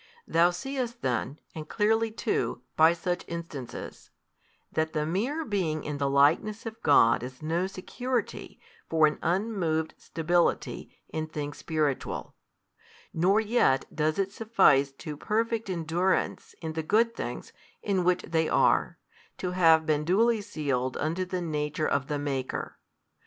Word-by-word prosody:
Thou 170 +1 +4
seest 240 +6 -4
then, 130 +3 -1 0.2
and 155 -1 -8
clearly 225 +1 +2
too, 220 - -2
by 160 +1 +6
such 175 +1 -2
instances, 165 -7 -7 0.6
that 160 0 -1
the 150 0 0
mere 245 - -1
being 175 -7 -1
in 145 -1 -4
the 140 -1 +1
likeness 160 +11 +3
of 225 0 -7
God 115 0 +5
is 130 +4 -8
no 170 +4 0
security 245 +6 -4 0.3
for 160 -1 +5
an 150 - 0
unmoved 170 -4 0
stability 170 +2 0 0.2
in 155 0 -3
things 145 -2 -5
spiritual, 155 -4 -2 0.8
nor 185 +6 +3
yet 220 - +2
does 155 0 +1
it 195 0 0
suffice 190 -12 +3
to 150 +2 -7
perfect 225 +5 -1
endurance 175 +1 -1
in 160 -1 -3
the 160 - -2
good 230 +8 +2
things - - -6 0.3
in 195 -3 +1
which 180 0 +2
they 160 -1 0
are, - - +3 0.4
to 180 - -3
have 165 -3 +5
been 150 -2 +1
duly 220 +7 +3
sealed 140 - -2
unto 165 +5 -1
the 185 0 -3
Nature 155 -1 -1
of 140 -1 0
the 150 - -1
Maker. 135 -3 -3
165 Hz, 140 wpm, -28 LUFS, 150-205 Hz, 0.8 s, by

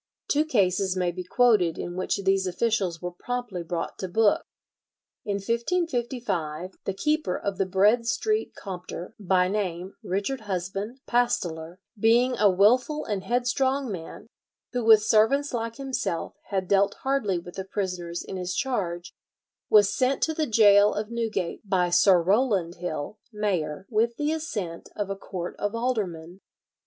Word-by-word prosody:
Two 300 +2 +2
cases 190 - +1
may 180 -1 +1
be 180 +1 -6
quoted 205 -5 +3
in 175 - -5
which 185 +2 -1
these 195 0 +2
officials 185 -3 -1
were 180 - -3
promptly 240 -1 -4
brought 170 0 -4
to 190 - -3
book. 210 +3 +2 0.8
In 205 - -1
1555 230 - -2
the 195 - -2
keeper 300 - 0
of 200 -1 -4
the 195 - +1
Bread 210 +5 +3
Street 430 - 0
Compter, 180 0 -7
by 185 -2 +2
name 185 -2 -3
Richard 205 +7 -2
Husband, 195 +4 -4
pasteler, 175 -9 0 0.2
"being 240 +4 +4
a 205 -1 +6
willful 250 +11 +3
and 205 -4 -3
headstrong 250 +3 0
man," 165 -4 -7 0.5
who, 245 -1 -1
with 220 -1 +7
servants 250 +7 +3
like 230 -1 -2
himself, 265 -11 -3
had 190 -2 -2
dealt 200 +1 +3
hardly 265 -9 +1
with 175 +1 -8
the 190 - -3
prisoners 180 -3 -3
in 190 - -6
his 180 0 -3
charge, 185 -10 -2 0.6
was 205 -1 +5
sent 260 +1 +1
to 320 - +1
the 310 -1 -1
gaol 210 -2 +6
of 210 +2 -3
Newgate 220 -7 -2
by 185 -3 +1
Sir 180 +1 +6
Rowland 195 -4 +1
Hill, 175 +3 -5
mayor, 190 -6 -2
with 230 +1 +1
the 295 +1 0
assent 210 - -4
of 200 -1 -3
a - - -2
court 180 -2 -6
of 205 +2 -2
aldermen. 195 -8 -3
200 Hz, 150 wpm, -26 LUFS, 180-235 Hz, 0.8 s, with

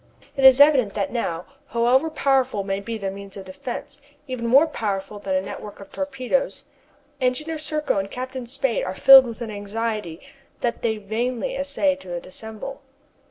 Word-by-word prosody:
It 275 - -2
is 265 0 +9
evident 275 -8 +5
that 200 -2 -1
now, 175 -8 -2 0.2
however 250 +6 +2
powerful 265 -8 +1
may 195 0 -2
be 225 +3 -5
their 195 -2 -3
means 200 0 -10
of 195 - -8
defence, 265 +9 -7 0.3
even 250 -3 -3
more 275 +6 +6
powerful 205 -8 -4
than 195 -2 -2
a 185 - +2
network 205 +1 -8
of 195 - -12
torpedoes, 285 - -2 0.6
Engineer 305 +6 -1
Serko 305 -8 -1
and 195 0 -4
Captain 255 +1 -6
Spade 255 -1 -1
are 185 - -4
filled 270 +2 +9
with 230 0 -8
an 225 -2 -4
anxiety 210 -4 -4 0.4
that 240 -1 -1
they 220 -2 0
vainly 225 +3 -2
essay 280 0 +1
to 175 -9 -6
dissemble. 220 +9 -8
235 Hz, 165 wpm, -23 LUFS, 200-270 Hz, 0.6 s, is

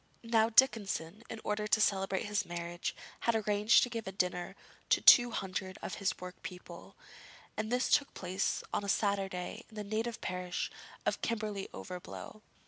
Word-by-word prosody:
Now 225 -1 +3
Dickinson, 215 -6 +3
in 225 - -6
order 210 0 -1
to 220 - +3
celebrate 195 -2 +1
his 205 0 0
marriage, 175 0 -4 0.2
had 235 - +1
arranged 210 +1 +4
to 245 - -1
give 230 -3 -4
a - - -3
dinner 180 -2 -2 0.3
to - - +5
two 240 -1 +9
hundred 190 -3 -4
of - - -4
his 195 - 0
workpeople, 180 0 -9 0.6
and 215 +1 -3
this 250 +1 +2
took 290 -1 +3
place 185 +2 -1
on - - 0
a 200 - -3
Saturday 195 -3 -1
in 220 - -16
his 210 - -4
native 220 +3 -2
parish 180 -1 -3 0.3
of - - 0
Kirkby 210 -4 -2
Overblow. 185 +3 -8
205 Hz, 160 wpm, -33 LUFS, 185-220 Hz, 0.6 s, two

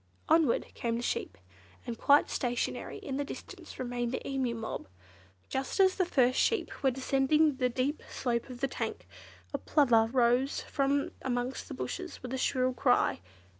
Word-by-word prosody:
Onward 320 -7 +3
came 230 -1 -2
the 235 - -3
sheep, - - -2 0.5
and 240 -2 -4
quite 285 +5 +5
stationary 245 -1 -2
in 270 -1 -5
the 285 - 0
distance 285 - -9
remained 245 -1 -2
the 260 - -4
Emu 265 -3 -1
mob. 225 - -5 0.6
Just 265 +8 -3
as 380 -1 +6
the 370 -2 0
first 255 -5 +3
sheep 450 - 0
were 270 - +4
descending 270 +3 +2
the 250 -1 +2
deep 260 +5 -1
slope 235 -1 -2
of 245 -1 -9
the 275 - +2
tank, - - -4 0.5
a - - -1
Plover 240 -7 +4
rose 250 +2 +2
from 280 0 0
amongst 245 0 -2
the - - -6
bushes 365 -6 -5
with 250 0 -5
a - - -1
shrill 255 -1 +1
cry. 245 - +2
260 Hz, 170 wpm, -31 LUFS, 245-280 Hz, 0.6 s, as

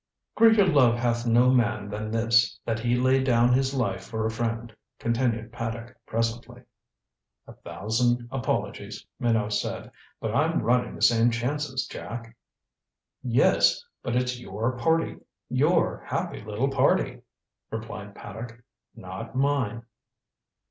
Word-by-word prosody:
"Greater 225 -3 +6
love 135 -9 +4
hath 120 0 0
no 120 +2 +5
man 120 -5 +1
than 105 +1 -4
this, 115 -2 +2
that 110 -1 -1
he 120 +1 +1
lay 130 +2 +3
down 120 -1 +4
his 135 +1 +2
life 100 -7 -1
for 110 +2 -3
a 110 - 0
friend," 115 0 -3 0.2
continued 115 -1 -1
Paddock 115 0 -5
presently. 115 +2 -3 0.8
"A - - -12
thousand 120 +4 -1
apologies," 135 -3 -3
Minot 110 -3 +1
said. 105 - -3 0.3
"But - - -3
I'm - - +1
running 120 +3 +1
the - - -5
same 115 0 +5
chances, 130 +3 -2
Jack." 115 +7 -8 0.9
"Yes 125 - +3 0.2
but 120 - -2
it's 125 0 0
your 115 +3 -3
party 165 +6 +1 0.3
your - - +2
happy - - -3
little 110 +6 -2
party," 135 -1 +2 0.5
replied 105 -3 -7
Paddock. 115 +3 -9 0.3
"Not 95 +6 -8
mine." 130 -5 0
120 Hz, 130 wpm, -26 LUFS, 110-125 Hz, 0.9 s, Greater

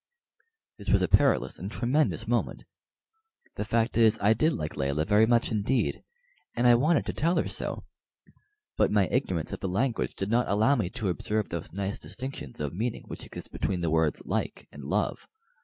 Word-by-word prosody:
This 100 - -7
was 100 -2 +4
a - - +2
perilous 65 -5 +2
and 95 +4 -5
a - - -4
tremendous 145 +6 +1
moment. - - -1 0.9
The - - -3
fact 115 +2 0
is, 110 -1 +5
I 105 +2 +4
did 140 +9 +2
like 75 - -4
Layelah 70 +2 0
very 105 +1 +4
much 120 0 +3
indeed, 110 +5 0 0.5
and 120 - +1
I 120 - +8
wanted 150 +7 +3
to - - -3
tell 170 +3 +1
her - - +1
so; - - -3 0.9
but - - +3
my 105 -2 +3
ignorance 95 - -1
of - - -5
the 95 - -3
language 115 +5 -1
did 95 +2 -3
not 120 +1 +2
allow 110 +7 +3
me 105 -9 -1
to 100 +1 -2
observe 105 +4 -1
those 85 -2 -5
nice 100 +2 -3
distinctions 125 - -7
of 75 -1 -3
meaning 110 +6 -3
which - - -7
exist - - -7
between 90 -3 -2
the 85 -2 0
words 80 -2 +1
"like" - - -3
and 70 - -10
"love." 95 +9 -1
105 Hz, 190 wpm, -28 LUFS, 90-120 Hz, 0.9 s, I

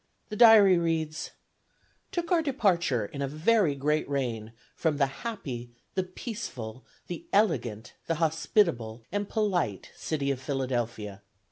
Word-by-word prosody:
The 215 - -4
Diary 210 -5 +8
reads: 160 -2 -1 0.8
"Took 340 -1 -3
our 345 -2 +4
departure, 185 - +1
in 140 +7 -7
a 140 - 0
very 160 +2 +2
great 150 +2 0
rain, 120 -6 -2 0.2
from 160 -3 0
the 140 - +4 0.2
happy, 135 - -5 0.2
the 190 - +1
peaceful, 180 - -6 0.2
the 175 -2 -7
elegant, 125 - +1
the 165 - +1
hospitable, 155 - +1
and 205 0 -2
polite 180 - -1
city 140 -3 -1
of 130 -1 -3
Philadelphia. 120 -7 -3
155 Hz, 130 wpm, -28 LUFS, 125-200 Hz, 0.8 s, Diary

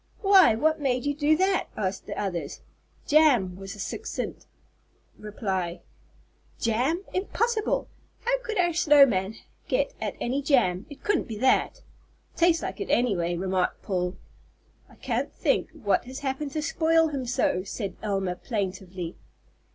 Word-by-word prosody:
"Why, 385 - +7
what 315 +6 +1
made 255 -2 0
you 285 - +1
do 300 +2 +2
that?" 380 +1 +1
asked 190 -2 -3
the - - -5
others. 185 -5 -4 0.4
"Jam!" 270 - +4
was 195 +1 -8
the 210 - -12
succinct 440 - -5 0.7
reply. 190 -5 -3 0.8
"Jam! 255 - 0
Impossible. 435 +3 0 0.3
How - - +1
could 450 -3 -4
our 345 -1 +2
snow 295 -4 +7
man 195 -3 -1 0.3
get - - 0
at - - -3
any 260 +4 -1
jam? 240 -10 +2
It 285 - -12
couldn't 415 - +1
be 220 -3 -6
that." 260 - +2 0.5
"Tastes 340 -1 +3
like - - -5
it, 405 - -4
any 240 -4 +2
way," 175 0 -1
remarked 185 0 -1
Paul. 180 -2 -1 0.7
"I - - -18
can't - - -2
think - - 0
what 255 -12 0
has 260 +2 -8
happened 280 +1 -2
to 310 - -2
spoil 325 +1 +3
him 270 -4 -4
so," 185 -6 +1
said 200 -2 -5
Elma, 195 -4 -1
plaintively. 185 -5 -4
250 Hz, 150 wpm, -26 LUFS, 195-315 Hz, 0.8 s, Why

